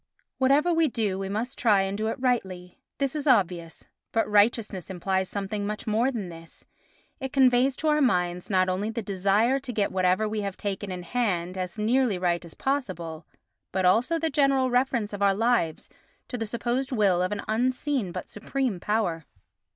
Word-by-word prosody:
Whatever 285 +6 +3
we 325 -1 +3
do 215 -7 -1
we 195 0 -3
must 230 +6 -3
try 210 -5 +4
and 195 +1 -2
do 215 +1 -2
it 225 - -3
rightly—this 240 - -2
is 300 0 -3
obvious—but 185 0 0
righteousness 210 -3 +2
implies 190 +1 -1
something 200 +1 -3
much 210 0 -4
more 225 +4 +2
than 220 -8 -4
this: 165 -1 -12 0.5
it 265 0 -4
conveys 260 -1 +4
to 315 - -2
our 300 0 +3
minds 180 -8 +1
not 185 -2 +3
only 190 +4 -1
the 225 0 -4
desire 200 +7 +2
to 265 -2 -6
get 210 -4 0
whatever 185 +3 +2
we 215 0 -2
have 200 -2 -4
taken 200 -1 -4
in 180 -1 -5
hand 180 -4 -1
as 185 +1 -4
nearly 230 -1 +2
right 175 -1 0
as 170 - -10
possible, 175 - -3 0.4
but 190 0 0
also 235 - +3
the 320 -1 -1
general 275 -2 +2
reference 245 -4 +1
of 205 - -5
our 200 -1 +4
lives 215 -8 +1 0.4
to - - -4
the 225 -2 -3
supposed 240 +4 -2
will 200 -7 +2
of 185 - 0
an 205 -1 -3
unseen 250 -1 0
but - - -6
supreme 235 -1 -3
power. 180 -6 -1
210 Hz, 180 wpm, -26 LUFS, 185-250 Hz, 0.5 s, try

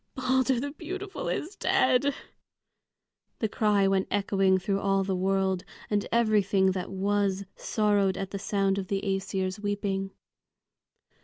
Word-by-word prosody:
"Balder 260 -1 +2
the 285 +3 -3
beautiful 380 - -5
is 360 +6 -3
dead!" 260 -1 +2 1.2
the 220 - 0
cry 205 -2 +2
went 195 -1 +1
echoing 195 -1 +2
through 195 +1 -1
all 195 -1 +1
the 190 -1 -1
world, 190 0 0 0.3
and 205 -1 +1
everything 205 -4 +3
that 185 -1 -4
was 200 0 0
sorrowed 205 -3 +1
at 195 -1 -4
the 200 - -4
sound 195 -1 0
of 190 - -5
the 195 0 -1
Æsir's 195 -1 -2
weeping. 200 -1 -2
200 Hz, 135 wpm, -28 LUFS, 195-220 Hz, 1.2 s, everything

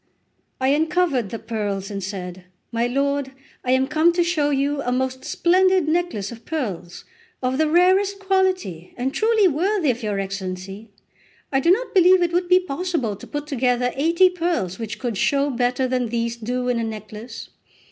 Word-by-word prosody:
I 260 0 +2
uncovered 305 - +1
the 230 - -4
pearls 210 -4 -4
and 200 -1 -4
said: 180 -1 -6 0.3
"My 235 +1 0
lord, 275 +1 -1 0.3
I 250 - -4
am 260 0 +3
come 310 +4 +3
to 345 0 +2
show 325 -4 +1
you 280 0 0
a 245 - -2
most 260 +1 -2
splendid 370 -1 +2
necklace 315 - -1
of 230 -1 -11
pearls, 210 - -5 0.4
of 255 +2 0
the 315 -1 +3
rarest 375 +4 +3
quality, 375 - -1
and 260 +2 -2
truly 440 -2 +3
worthy 350 0 +1
of 245 +1 -6
your 210 -3 -2
Excellency; 195 +2 -5 0.6
I 270 - +2
do 335 - +1
not 450 +5 +2
believe 370 -1 +6
it 340 -1 -1
would 355 0 0
be 365 0 +6
possible 330 - -2
to - - -12
put 295 0 -4
together 250 -3 0
eighty 335 +6 +4
pearls 330 - -2
which 215 -2 -5
could 230 -2 -3
show 280 0 +2
better 250 +1 0
than 250 -1 0
these 235 0 -1
do 245 +2 -3
in 245 -1 +1
a - - -1
necklace. 220 +1 -7
265 Hz, 180 wpm, -22 LUFS, 225-345 Hz, 0.6 s, believe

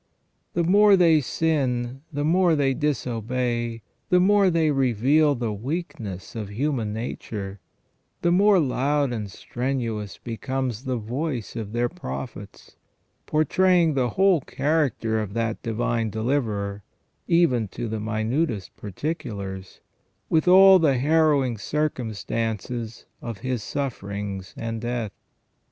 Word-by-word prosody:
The 170 - +2
more 200 +3 +6
they 165 -4 +5
sin, 130 -4 -1
the 145 -1 -2
more 175 +1 +4
they 140 -2 +2
disobey, 120 -4 -2 0.3
the 180 - +5
more 200 +1 +4
they 165 -3 +2
reveal 135 +3 +3
the 115 -3 -2
weak 145 - -4
ness 100 0 -7
of 105 -3 -4
human 120 -1 -1
nature, 105 -3 -5 0.6
the 175 - +3
more 195 +2 +5
loud 140 -1 +1
and 105 -3 -4
strenuous 115 -2 -3
becomes 125 +1 -4
the 130 -1 -1
voice 120 +2 -4
of 110 -3 -5
their 120 +1 +1
prophets, 65 - -8 0.5
portraying 170 +2 +3
the 130 -3 +1
whole 190 -4 +4
character 135 -7 0
of 105 -1 -4
that 115 -1 -1
Divine 115 0 -1
Deliverer, 110 -4 -1 0.5
even 150 -10 +3
to 115 - -5
the 110 0 -3
minutest 110 - -2
particulars, 100 - -5 0.5
with 160 +2 +2
all 190 +1 +8
the 145 -6 +3
harrowing 145 -4 +2
circumstances 115 -4 -3 0.2
of 115 -3 -5
His 125 -3 -2
sufferings 100 -7 -4
and 115 -1 -4
death. 120 -3 -2
125 Hz, 120 wpm, -24 LUFS, 110-155 Hz, 0.6 s, all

